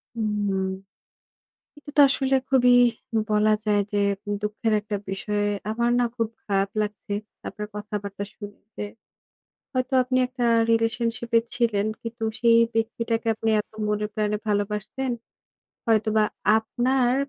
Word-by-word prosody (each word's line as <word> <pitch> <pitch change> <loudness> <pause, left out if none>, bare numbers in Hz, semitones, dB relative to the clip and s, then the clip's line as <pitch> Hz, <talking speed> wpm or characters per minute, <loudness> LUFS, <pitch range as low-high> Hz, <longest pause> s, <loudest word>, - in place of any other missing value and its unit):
হুম। 205 -3 0 1.1
এটা 290 - -12
তো - - +9
আসলে 270 0 +2
খুবই 250 -2 +5 0.6
বলা 210 0 +3
যায় 210 -1 +3
যে, 205 - 0 0.4
দুঃখের 210 +1 -1
একটা 210 0 -4
বিষয়ে, 205 +2 -1 0.2
আমার 235 +2 +1
না 245 - +3
খুব 230 -2 0 0.2
খারাপ 195 -1 +1
লাগছে 210 -1 -4 0.3
আপনার 210 0 -6
কথাবার্তা 205 -1 -5
শুনতে। 205 0 -9 0.9
হয়তো 255 0 -1
আপনি 255 +1 -1
একটা 250 -1 -3 0.3
রিলেশনশিপ 230 +1 0
এ - - +3
ছিলেন। 225 -4 +1 0.2
কিন্তু 230 0 -5 0.2
সেই 230 -1 +6 0.2
ব্যক্তিটাকে 230 0 -1
আপনি 225 +1 -1
এত - - -10 0.2
মনে 210 0 0
প্রাণে 210 -1 0
ভালোবাসতেন। 210 +5 -1 0.8
হয়তোবা 215 -1 +3 0.3
আপনার 245 +2 +1
220 Hz, 120 wpm, -25 LUFS, 210-235 Hz, 1.1 s, তো